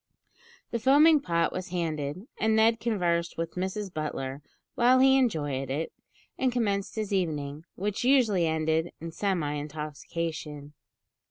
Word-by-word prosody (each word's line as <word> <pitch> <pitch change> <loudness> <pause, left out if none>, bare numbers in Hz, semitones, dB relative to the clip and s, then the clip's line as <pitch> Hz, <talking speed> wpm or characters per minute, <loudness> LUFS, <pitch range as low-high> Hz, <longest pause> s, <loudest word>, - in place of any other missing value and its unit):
The 235 - -1
foaming 295 +6 +6
pot 170 -7 0
was 185 0 -4
handed, 165 0 -3
and 220 0 +2
Ned 225 +1 +4
conversed 175 -7 0
with 165 0 -3
Mrs 190 +1 -3
Butler 140 -3 -4 0.3
while 245 +2 +5
he 265 +1 +6
enjoyed 145 - 0
it, 150 +5 -3 0.5
and 260 -1 +2
commenced 205 -5 -1
his 215 -2 -2
evening, 155 -4 -2
which 205 +3 -2
usually 230 -10 +4
ended 160 +1 0
in 165 +1 -6
semi 170 -5 -1
intoxication. 150 0 -5
170 Hz, 135 wpm, -28 LUFS, 155-220 Hz, 0.5 s, foaming